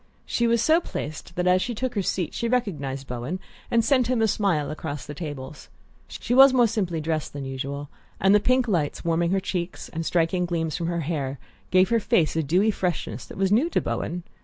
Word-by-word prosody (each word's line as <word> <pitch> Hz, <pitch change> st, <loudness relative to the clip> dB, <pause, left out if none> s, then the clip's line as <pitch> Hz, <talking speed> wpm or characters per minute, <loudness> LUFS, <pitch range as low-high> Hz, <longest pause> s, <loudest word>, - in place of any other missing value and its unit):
She 235 Hz, -, +1 dB
was 230 Hz, -1 st, +2 dB
so 320 Hz, +2 st, +4 dB
placed 155 Hz, -, -6 dB
that 180 Hz, -, -1 dB
as 180 Hz, 0 st, +4 dB
she 240 Hz, +2 st, -2 dB
took 255 Hz, +2 st, -2 dB
her 205 Hz, -, 0 dB
seat 180 Hz, -2 st, -2 dB
she 235 Hz, -, -2 dB
recognized 150 Hz, -, -1 dB
Bowen 125 Hz, +9 st, -4 dB, 0.3 s
and 230 Hz, -1 st, +2 dB
sent 255 Hz, -1 st, +3 dB
him 250 Hz, -2 st, +1 dB
a -, -, +4 dB
smile 185 Hz, -8 st, 0 dB
across 150 Hz, -2 st, -5 dB
the 145 Hz, -, -7 dB
tables. 145 Hz, -2 st, -7 dB, 0.4 s
She -, -, -4 dB
was 270 Hz, +1 st, +8 dB
more 245 Hz, -2 st, +5 dB
simply 200 Hz, -7 st, -1 dB
dressed 155 Hz, -1 st, -2 dB
than 140 Hz, -1 st, -5 dB
usual, 140 Hz, +2 st, -4 dB, 0.3 s
and 195 Hz, +2 st, +4 dB
the 210 Hz, -, +6 dB
pink 255 Hz, +3 st, +2 dB
lights, 170 Hz, -9 st, -1 dB
warming 170 Hz, 0 st, +1 dB
her 195 Hz, +2 st, +2 dB
cheeks 180 Hz, -2 st, -4 dB
and 165 Hz, 0 st, -4 dB
striking 175 Hz, +2 st, +1 dB
gleams 165 Hz, -2 st, -1 dB
from 170 Hz, -2 st, -2 dB
her 170 Hz, -1 st, -1 dB
hair, 140 Hz, -3 st, -2 dB, 0.3 s
gave 185 Hz, +1 st, +4 dB
her 230 Hz, -1 st, +3 dB
face 165 Hz, -7 st, +2 dB
a 160 Hz, -, +2 dB
dewy 180 Hz, +9 st, +2 dB
freshness 170 Hz, -, -3 dB
that -, -, -10 dB
was 195 Hz, 0 st, +1 dB
new 255 Hz, +11 st, +3 dB
to -, -, +1 dB
Bowen. 175 Hz, +1 st, -3 dB
175 Hz, 215 wpm, -25 LUFS, 155-220 Hz, 0.4 s, was